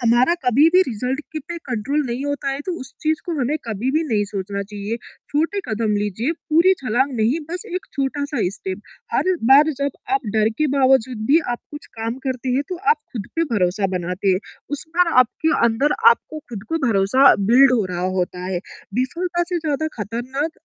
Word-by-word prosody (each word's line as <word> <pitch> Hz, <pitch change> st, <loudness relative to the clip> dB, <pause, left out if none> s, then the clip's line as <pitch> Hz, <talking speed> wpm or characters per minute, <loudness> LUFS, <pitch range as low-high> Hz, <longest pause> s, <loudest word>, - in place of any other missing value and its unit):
हमारा 240 Hz, +6 st, +4 dB
कभी-भी 305 Hz, +9 st, +5 dB
रिज़ल्ट 255 Hz, -, -3 dB
के 315 Hz, -, -3 dB
पे 335 Hz, +4 st, -7 dB
कंट्रोल 255 Hz, +4 st, -1 dB
नहीं 245 Hz, +3 st, -3 dB
होता 285 Hz, -1 st, -2 dB
है 275 Hz, +1 st, -3 dB
तो 370 Hz, -, -1 dB
उस 260 Hz, -, -9 dB
चीज़ 315 Hz, 0 st, 0 dB
को 350 Hz, -, -2 dB
हमें 270 Hz, +4 st, +1 dB
कभी-भी 245 Hz, +8 st, -1 dB
नहीं 210 Hz, -4 st, +1 dB
सोचना 200 Hz, 0 st, -4 dB
चाहिए, 205 Hz, +2 st, -5 dB, 0.3 s
छोटे 325 Hz, +7 st, 0 dB
कदम 220 Hz, 0 st, 0 dB
लीजिए, 210 Hz, -, -1 dB
पूरी 335 Hz, +3 st, +3 dB
छलाँग 255 Hz, +3 st, +1 dB
नहीं, 230 Hz, +7 st, +2 dB
बस 355 Hz, +1 st, -3 dB
एक 365 Hz, -, -3 dB
छोटा-सा 285 Hz, +1 st, -2 dB, 0.2 s
स्टेप 190 Hz, -2 st, -5 dB, 0.3 s
हर 350 Hz, +10 st, +2 dB, 0.2 s
बार 295 Hz, +3 st, +7 dB
जब 280 Hz, 0 st, 0 dB, 0.2 s
आप 270 Hz, -, +3 dB
डर 215 Hz, 0 st, +4 dB
के 305 Hz, -, +3 dB
बावजूद 260 Hz, -4 st, +3 dB
भी 295 Hz, +6 st, +5 dB
आप 240 Hz, -, -2 dB
कुछ 295 Hz, 0 st, -9 dB
काम 225 Hz, +1 st, -2 dB
करते 260 Hz, -1 st, -2 dB
हैं 275 Hz, -, +2 dB
तो 365 Hz, -, -3 dB
आप 455 Hz, -, +5 dB, 0.2 s
ख़ुद 210 Hz, -5 st, -5 dB
पे 330 Hz, -, +2 dB
भरोसा 195 Hz, 0 st, +1 dB
बनाते 180 Hz, +3 st, -2 dB
हैं, 185 Hz, -1 st, +4 dB, 0.3 s
उस 290 Hz, -1 st, -4 dB
बार 355 Hz, -2 st, +4 dB
आपके 315 Hz, +6 st, +1 dB
अंदर 245 Hz, +6 st, +2 dB, 0.2 s
आपको 315 Hz, -8 st, -2 dB
ख़ुद 215 Hz, -5 st, -6 dB
को 325 Hz, -, 0 dB
भरोसा 220 Hz, +6 st, +5 dB
बिल्ड 250 Hz, +6 st, +6 dB
हो 230 Hz, -5 st, +2 dB
रहा 180 Hz, 0 st, -2 dB
होता 180 Hz, 0 st, -2 dB
है। 185 Hz, -1 st, -1 dB, 0.4 s
विफ़लता 345 Hz, +8 st, -1 dB
से 355 Hz, -2 st, -1 dB
ज़्यादा 310 Hz, -1 st, -1 dB, 0.2 s
खतरनाक 250 Hz, -, -3 dB
255 Hz, 190 wpm, -21 LUFS, 215-300 Hz, 0.4 s, बार